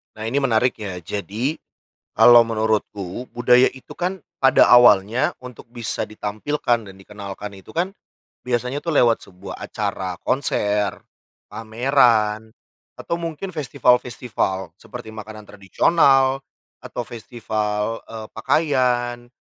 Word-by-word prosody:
Nah 110 Hz, -, -8 dB
ini 115 Hz, +6 st, 0 dB
menariknya. 110 Hz, -6 st, 0 dB
Jadi, 110 Hz, -, -3 dB, 0.6 s
kalo 120 Hz, -1 st, +7 dB
menurutku 110 Hz, -1 st, -2 dB
budaya 125 Hz, +1 st, +5 dB
itu 130 Hz, -, -15 dB
kan 180 Hz, -1 st, -4 dB, 0.2 s
pada 135 Hz, 0 st, +5 dB
awalnya 120 Hz, -1 st, +5 dB
untuk 125 Hz, -2 st, -11 dB
bisa 120 Hz, -2 st, -3 dB
ditampilkan 110 Hz, +3 st, -2 dB
dan 95 Hz, -, -12 dB
dikenalkan 100 Hz, +1 st, -8 dB
itu 95 Hz, -1 st, -14 dB
kan 180 Hz, +3 st, 0 dB, 0.6 s
biasanya 125 Hz, +3 st, -1 dB
tuh 165 Hz, -3 st, -2 dB
lewat 120 Hz, -4 st, +4 dB
sebuah 95 Hz, 0 st, -10 dB
acara 90 Hz, -1 st, -4 dB
konser, 105 Hz, -6 st, 0 dB, 0.5 s
pameran, 110 Hz, -2 st, +2 dB, 0.5 s
atau -, -, -4 dB
mungkin 170 Hz, +3 st, -5 dB
festival-festival 125 Hz, -, 0 dB
seperti 120 Hz, -3 st, -10 dB
makanan 110 Hz, 0 st, -9 dB
tradisional 135 Hz, -, +2 dB, 0.4 s
atau 120 Hz, -, -5 dB
festival, 110 Hz, -2 st, -3 dB
eee, 110 Hz, -1 st, -7 dB
pakaian 125 Hz, -3 st, 0 dB
115 Hz, 110 wpm, -21 LUFS, 105-130 Hz, 0.6 s, kalo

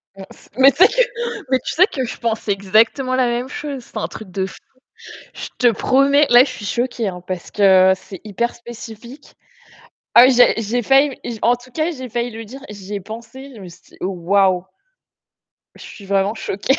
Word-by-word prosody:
Mince, 195 Hz, 0 st, -14 dB
mais 270 Hz, +1 st, +7 dB
tu 270 Hz, -, -18 dB
sais -, -, +7 dB
que -, -, +1 dB, 0.5 s
mais 260 Hz, -, +3 dB
tu -, -, -5 dB
sais 365 Hz, +3 st, +6 dB
que 265 Hz, -, -4 dB
je -, -, -7 dB
pensais 225 Hz, -2 st, -2 dB
exactement 220 Hz, +7 st, +1 dB
la 255 Hz, -1 st, +2 dB
même 240 Hz, +2 st, -2 dB
chose. 280 Hz, -3 st, -6 dB
C'est 220 Hz, -, -12 dB
un -, -, -2 dB
truc, 215 Hz, -4 st, -11 dB
de 190 Hz, +1 st, -2 dB
fou. -, -, -10 dB, 0.8 s
Je -, -, -7 dB
te 245 Hz, -2 st, +4 dB
promets, 275 Hz, +6 st, +3 dB
là, 240 Hz, +1 st, +8 dB
je 270 Hz, -, -4 dB
suis 215 Hz, -5 st, -8 dB
choquée, 240 Hz, -1 st, -2 dB
hein, 180 Hz, -1 st, -6 dB
parce 185 Hz, -2 st, -6 dB
que 190 Hz, -2 st, +5 dB
c'est 190 Hz, 0 st, -12 dB
hyper 225 Hz, +3 st, -2 dB
spécifique. 235 Hz, +3 st, -12 dB, 0.8 s
Ah 240 Hz, -, +9 dB
oui, 265 Hz, -, +4 dB
j'ai 245 Hz, 0 st, +5 dB
j'ai 235 Hz, +3 st, -2 dB
failli, 270 Hz, +2 st, +3 dB
j'ai 230 Hz, -2 st, -5 dB
en 240 Hz, +2 st, +4 dB
tout 245 Hz, +1 st, -14 dB
cas, 315 Hz, +5 st, -1 dB
j'ai 260 Hz, -3 st, -8 dB
failli 240 Hz, +2 st, -3 dB
lui 225 Hz, 0 st, -8 dB
dire, 265 Hz, +5 st, -11 dB
j'y 205 Hz, 0 st, -8 dB
ai 200 Hz, -, -3 dB
pensé, 235 Hz, +7 st, -10 dB
je 215 Hz, -, -12 dB
me 185 Hz, -, -10 dB
suis 170 Hz, -, -15 dB
dit: -, -, -18 dB
«Waouh!» 185 Hz, 0 st, +1 dB, 1.1 s
Je -, -, -15 dB
suis 200 Hz, -, -12 dB
vraiment 195 Hz, +1 st, 0 dB
choquée. 220 Hz, +4 st, -1 dB
235 Hz, 205 wpm, -19 LUFS, 200-255 Hz, 1.1 s, Ah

